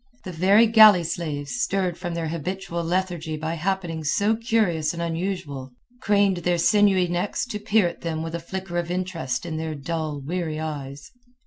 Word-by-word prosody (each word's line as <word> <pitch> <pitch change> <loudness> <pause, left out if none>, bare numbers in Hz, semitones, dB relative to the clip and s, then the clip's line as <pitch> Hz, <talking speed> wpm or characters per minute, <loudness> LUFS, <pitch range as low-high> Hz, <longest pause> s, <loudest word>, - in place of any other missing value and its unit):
The 185 - -6
very 195 +7 +5
galley 215 -5 +7
slaves, 160 +3 -3
stirred 185 -3 0
from 175 -1 -5
their 165 -2 -2
habitual 170 +1 -4
lethargy 170 -2 -2
by 160 +2 -3
happenings 170 -3 -2
so 210 +2 +2
curious 210 -9 0
and 170 - -5
unusual, 165 -6 -4 0.3
craned 200 -2 +3
their 175 0 0
sinewy 195 0 +4
necks 175 +7 -1
to 215 -4 -5
peer 210 -2 +2
at 170 - -7
them 160 -1 -3
with 165 0 -5
a 170 - -2
flicker 175 +1 -4
of 170 -1 -4
interest 180 -6 -3
in 160 -2 -4
their 160 -1 -3
dull, 155 0 -3
weary 160 +1 -3
eyes. 145 -3 -6
170 Hz, 175 wpm, -24 LUFS, 160-190 Hz, 0.3 s, galley